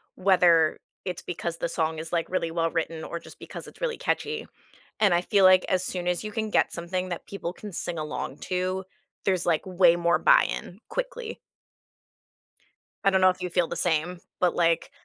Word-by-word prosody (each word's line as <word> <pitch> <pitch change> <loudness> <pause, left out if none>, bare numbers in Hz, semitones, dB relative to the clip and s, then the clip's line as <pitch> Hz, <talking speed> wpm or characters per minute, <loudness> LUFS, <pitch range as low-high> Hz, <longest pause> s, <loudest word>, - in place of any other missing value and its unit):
whether 175 -4 +4 0.3
it's 180 -2 -4
because 170 -1 -4
the - - -1
song 160 -1 -1
is, 160 +1 -6
like, 165 -1 0
really 170 -3 -1
well-written, 165 -1 -1
or 170 - -5
just - - -14
because - - -8
it's - - -15
really 480 -2 -1
catchy, 450 +1 -2 0.5
and 200 -5 +4
I 175 - +3
feel 200 +1 +2
like, 185 -1 +7
as 185 -1 +2
soon 180 -1 -3
as 180 +2 0
you 215 - -5
can 220 0 -2
get - - +2
something 180 +2 -3
that 175 - -5
people 185 -3 -5
can 205 -1 -9
sing 170 0 -4
along 150 -2 -4
to, 185 +1 -1 0.4
there's, 185 -2 +1
like, 165 0 +1
way 180 -2 +5
more 170 0 +2
buy-in, - - +3
quickly. - - -4 1.6
I 195 - +5
don't 190 -1 +2
know 185 - +7
if 185 0 -3
you 180 - -2
feel 175 -1 +1
the - - -5
same, 175 +1 0 0.2
but, 180 -1 +2
like, 165 -1 +2
180 Hz, 190 wpm, -26 LUFS, 170-190 Hz, 1.6 s, like